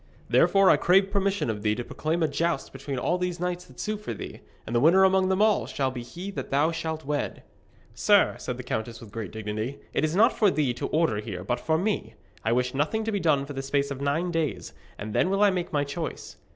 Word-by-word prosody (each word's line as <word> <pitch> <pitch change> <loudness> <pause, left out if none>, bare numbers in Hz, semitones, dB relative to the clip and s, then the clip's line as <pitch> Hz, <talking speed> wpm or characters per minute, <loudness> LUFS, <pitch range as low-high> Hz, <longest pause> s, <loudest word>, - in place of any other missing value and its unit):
Therefore 195 -1 +5
I - - +5
crave 195 +2 +3
permission 200 -3 0
of 105 -1 -6
thee 105 0 +1
to 120 - -4
proclaim 160 +6 -2
a - - +3
joust 165 +1 -1
between 135 0 -5
all 175 +8 0
these 180 -1 -2
knights 180 0 -3
that 130 - -17
sue 215 0 -2
for 205 - -6
thee, - - -8 0.3
and 115 - -4
the - - +4
winner 170 +8 +6
among 190 0 +4
them 190 +2 +3
all 205 - +2
shall 135 0 -1
be 125 -1 -6
he 175 +11 -7
that - - -6
thou 145 +4 +2
shalt 160 -2 -4
wed.' 145 0 -3 0.5
'Sir,' - - +4
said - - -4
the - - -6
countess 115 +1 -4
with 110 -3 -12
great 110 -3 -5
dignity, 110 +4 -4 0.2
'it - - 0
is 155 +2 0
not 225 +5 +5
for 210 - +4
thee 145 -8 +1
to 120 - -4
order 155 -9 +1
here, 100 -4 -5
but 120 +5 -1
for 160 0 +1
me. 175 - -2 0.3
I 110 - +1
wish 125 +1 +1
nothing 155 +11 0
to 220 - -2
be 205 - 0
done 150 -5 +2
for 145 - -7
the 135 - -3
space 140 +1 -1
of 140 -1 -5
nine 160 +6 0
days, 165 -4 -2 0.2
and 105 +1 -6
then 180 - +2
will 195 +2 +2
I 205 - +6
make 180 -2 -3
my 145 -2 +1
choice.' 155 +3 -5
155 Hz, 245 wpm, -26 LUFS, 125-180 Hz, 0.5 s, winner